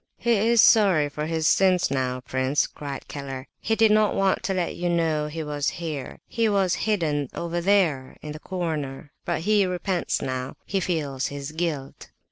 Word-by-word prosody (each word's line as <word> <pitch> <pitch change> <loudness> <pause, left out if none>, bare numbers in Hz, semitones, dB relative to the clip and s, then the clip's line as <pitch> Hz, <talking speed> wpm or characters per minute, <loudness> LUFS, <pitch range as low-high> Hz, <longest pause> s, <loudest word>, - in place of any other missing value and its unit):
"He 235 - 0
is 225 +2 +4
sorry 190 -10 +5
for 150 +1 -4
his 160 -1 -1
sins 185 -2 +3
now, 130 -2 -1
prince," 130 +3 0
cried 140 -3 -7
Keller. 135 -2 -6
"He 225 - 0
did 220 -1 +4
not 215 -1 +3
want 195 -1 +2
to 195 - 0
let 180 -2 -1
you 175 0 -1
know 160 -3 +1
he 160 +1 -5
was 145 -1 -1
here; 155 -6 -5
he 230 -1 0
was 195 -3 +2 0.2
hidden 150 -9 0
over 170 0 -2
there 170 -9 +1
in 150 - -5
the 150 - -7
corner,—but 160 -2 -4
he 210 +3 +3
repents 180 0 -1
now, 130 -1 -4
he 195 - -1
feels 145 -8 -1
his 140 +1 -6
guilt." 155 -4 -4
160 Hz, 175 wpm, -25 LUFS, 140-190 Hz, 0.2 s, sorry